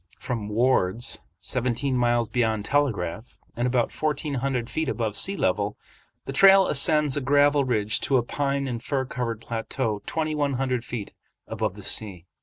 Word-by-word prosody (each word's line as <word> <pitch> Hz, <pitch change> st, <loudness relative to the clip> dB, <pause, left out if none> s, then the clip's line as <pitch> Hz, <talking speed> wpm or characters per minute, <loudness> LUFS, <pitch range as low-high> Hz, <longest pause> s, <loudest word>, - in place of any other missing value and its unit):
From 110 Hz, -4 st, -4 dB
"Ward's," 115 Hz, -2 st, +1 dB, 0.2 s
seventeen 125 Hz, +2 st, 0 dB
miles 120 Hz, -1 st, +2 dB
beyond 110 Hz, -3 st, 0 dB
Telegraph, 110 Hz, -7 st, -1 dB, 0.2 s
and 120 Hz, +1 st, 0 dB
about 125 Hz, -2 st, +1 dB
fourteen 150 Hz, -1 st, -2 dB
hundred 130 Hz, -2 st, -1 dB
feet 150 Hz, +4 st, -2 dB
above 110 Hz, -5 st, -2 dB
sea 195 Hz, +1 st, 0 dB
level, 100 Hz, +3 st, 0 dB, 0.5 s
the 135 Hz, -, -5 dB
trail 195 Hz, +5 st, +7 dB
ascends 150 Hz, -1 st, +3 dB
a 145 Hz, -, -1 dB
gravel 145 Hz, +1 st, +3 dB
ridge 110 Hz, -4 st, 0 dB
to 135 Hz, -, +2 dB
a 120 Hz, -, +1 dB
pine 140 Hz, +2 st, -1 dB
and 120 Hz, -3 st, -4 dB
fir 135 Hz, -2 st, -1 dB
covered 120 Hz, -4 st, -4 dB
plateau 115 Hz, -1 st, -3 dB
twenty 155 Hz, -1 st, -1 dB
one 145 Hz, -2 st, 0 dB
hundred 130 Hz, -2 st, -1 dB
feet 120 Hz, -5 st, -6 dB, 0.3 s
above -, -, -3 dB
the -, -, -11 dB
sea. 95 Hz, -6 st, -1 dB
125 Hz, 165 wpm, -25 LUFS, 115-140 Hz, 0.5 s, trail